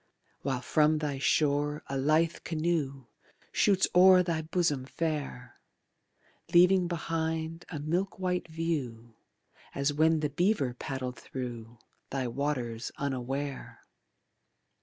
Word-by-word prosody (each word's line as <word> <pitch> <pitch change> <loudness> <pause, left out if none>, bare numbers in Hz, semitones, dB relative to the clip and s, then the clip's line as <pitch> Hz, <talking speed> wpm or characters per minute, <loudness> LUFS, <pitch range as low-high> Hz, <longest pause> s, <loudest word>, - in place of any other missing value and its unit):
While 130 -2 -2
from 155 +4 +3
thy 145 -3 -2
shore 145 +1 +1
a 135 - -5
lithe 155 +5 +2
canoe 155 -5 -1 0.5
Shoots 195 -2 +3
o'er 185 0 +7
thy 165 -2 -1
bosom 155 -5 0
fair, 145 -5 -4 1.0
Leaving 180 +1 +6
behind 165 0 -3
a 160 - -5
milk 170 +7 -1
white 180 -2 -1
view 140 -9 -3 0.6
As 140 +1 +1
when 160 +1 +3
the 150 - 0
beaver 160 - +1
paddled 130 0 -5
thru 120 -3 -7 0.3
Thy 130 -2 -2
waters 120 -3 -2
unaware. 135 0 -4
150 Hz, 110 wpm, -30 LUFS, 135-165 Hz, 1.0 s, o'er